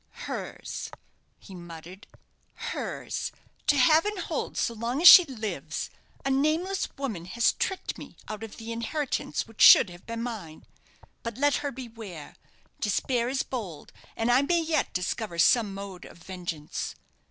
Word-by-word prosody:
"Hers!" - - -5 0.5
he 195 - -14
muttered; 175 +2 -10 0.5
"hers! - - -4 0.4
to 290 - +4
have 310 +5 +6
and 420 0 -2
hold - - -3
so 235 - 0
long 235 +4 -2
as 350 - +7
she 360 +1 +12
lives! 225 -7 -5 0.3
A 275 - +1
nameless 315 +8 +1
woman 225 -12 -4
has 235 +6 +2
tricked 380 - -3
me - - -11
out 215 -1 -6
of 225 -2 -8
the 225 0 -7
inheritance 230 - -2
which 225 -1 -9
should 185 - +9
have 175 +1 -14
been 230 0 -4
mine. 205 -10 -7 0.6
But 230 -1 -5
let 290 +1 +3
her 285 - -3
beware! 225 - -9 0.4
Despair 235 +3 0
is 265 0 0
bold, 200 - -6 0.2
and 225 +2 +1
I 250 +2 +5
may 335 +4 +2
yet 320 -1 0
discover 180 +1 -3
some 215 +5 +4
mode 195 -2 -8
of - - -13
vengeance." 175 -4 -5
230 Hz, 155 wpm, -27 LUFS, 190-275 Hz, 0.6 s, she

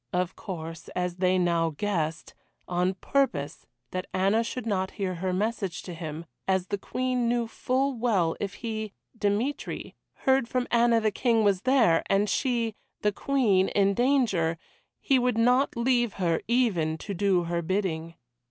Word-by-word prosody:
Of 180 0 -1
course 165 -4 -7
as 180 -1 -2
they 185 0 +2
now 170 -3 +1
guessed 170 -5 -2 0.3
on 180 +1 0
purpose 185 - -1 0.2
that 185 0 -4
Anna 195 +5 +3
should 240 0 -5
not 190 -4 0
hear 190 -3 -1
her 185 +2 -2
message 195 -1 -2
to 180 - -7
him 160 -1 -6 0.2
as 190 -1 +2
the 205 - -2
Queen 250 +1 -1
knew 240 0 +1
full 265 +4 0
well 205 -9 +1
if 200 -1 -4
he 220 -3 -4 0.2
Dmitry 225 +6 -2 0.3
heard 265 -2 +3
from 250 0 -1
Anna 235 -1 +4
the 215 -1 +1
King 230 0 +2
was 200 -3 +2
there, 245 -10 +4
and 200 +1 +2
she 235 -1 0 0.3
the 210 - +3
Queen 205 -6 +2
in 200 -1 +2
danger, 220 -10 +2 0.4
he 270 -3 +3
would 250 -2 +1
not 250 +3 +3
leave 240 -2 +2
her, 170 -4 0
even 200 -10 +1
to 200 - -6
do 190 -1 +2
her 170 0 -1
bidding. 165 -2 -2
200 Hz, 160 wpm, -27 LUFS, 180-235 Hz, 0.4 s, Anna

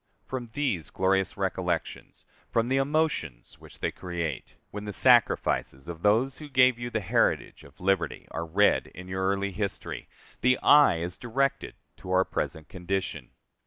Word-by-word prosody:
From 125 -3 -5
these 115 - -1
glorious 95 0 0
recollections, 90 -3 -3 0.2
from 115 +1 +1
the 135 - +2
emotions 135 - -1
which - - -15
they - - 0
create, 85 -4 -5 0.2
when 105 0 -6
the 105 - -5
sacrifices 70 -5 +3
of 85 -1 -7
those 115 +7 +2
who 150 -1 -9
gave 130 -2 +4
you 120 0 -4
the 110 -2 -2
heritage 95 - 0
of - - -17
liberty 95 -3 0
are 85 - -4
read 100 +6 +3
in 90 0 -9
your 95 0 -1
early 100 0 -1
history, 100 +1 -5 0.3
the 125 +1 +4
eye 145 - +6
is 85 +2 -5
directed 135 +3 -1 0.2
to - - -11
our 95 0 +3
present 80 -1 -4
condition. 95 +1 -4
95 Hz, 160 wpm, -27 LUFS, 90-120 Hz, 0.3 s, eye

